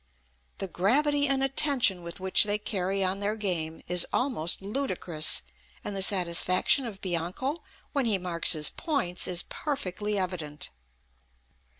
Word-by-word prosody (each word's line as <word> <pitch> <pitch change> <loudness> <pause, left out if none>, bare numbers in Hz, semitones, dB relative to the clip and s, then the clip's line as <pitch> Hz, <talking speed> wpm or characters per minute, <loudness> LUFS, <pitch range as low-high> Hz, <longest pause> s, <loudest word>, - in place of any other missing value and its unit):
The 195 - -3
gravity 285 +11 +2
and 270 -1 +2
attention 270 -8 +2
with 170 +2 -8
which 190 +2 +3
they 205 0 +2
carry 195 -2 -1
on 190 +1 -1
their 205 +1 -1
game 170 -7 -2
is 180 0 +3
almost 235 - 0
ludicrous; 190 - 0 0.4
and 205 - -4
the 195 - -1
satisfaction 185 +6 +3
of 200 -4 -8
Bianco 185 - -2 0.3
when 280 -3 +1
he 210 -3 +3
marks 180 -2 +1
his 150 -2 +2
points 265 - 0
is 175 -1 0
perfectly 210 - -3
evident." 170 -6 -4
195 Hz, 135 wpm, -28 LUFS, 175-250 Hz, 0.4 s, which